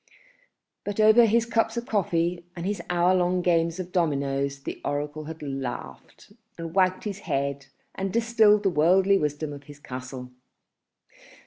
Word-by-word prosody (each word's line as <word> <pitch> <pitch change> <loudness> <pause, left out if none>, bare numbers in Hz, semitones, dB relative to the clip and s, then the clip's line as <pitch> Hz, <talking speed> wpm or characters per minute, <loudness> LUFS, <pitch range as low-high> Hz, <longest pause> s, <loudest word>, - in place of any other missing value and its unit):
But 205 +1 -4
over 220 +2 +7
his 230 +2 +2
cups 225 0 0
of 235 - -3
coffee 175 -4 0
and 175 0 -5
his 200 -2 -2
hour 175 +1 +3
long 180 0 +1
games 170 0 +1
of 180 -1 -5
dominoes 140 -5 -1
the - - -6
oracle 150 +1 -3
had 160 0 -8
laughed 135 - -7 0.2
and 165 -1 -6
wagged 185 0 +2
his 205 -2 -4
head 140 -5 -2 0.3
and 195 0 -3
distilled 225 -2 +4
the 195 - +2
worldly 185 +5 +4
wisdom 150 0 -2
of 140 0 -11
his 145 0 -12
castle. 125 -1 -8
170 Hz, 150 wpm, -26 LUFS, 145-200 Hz, 0.3 s, over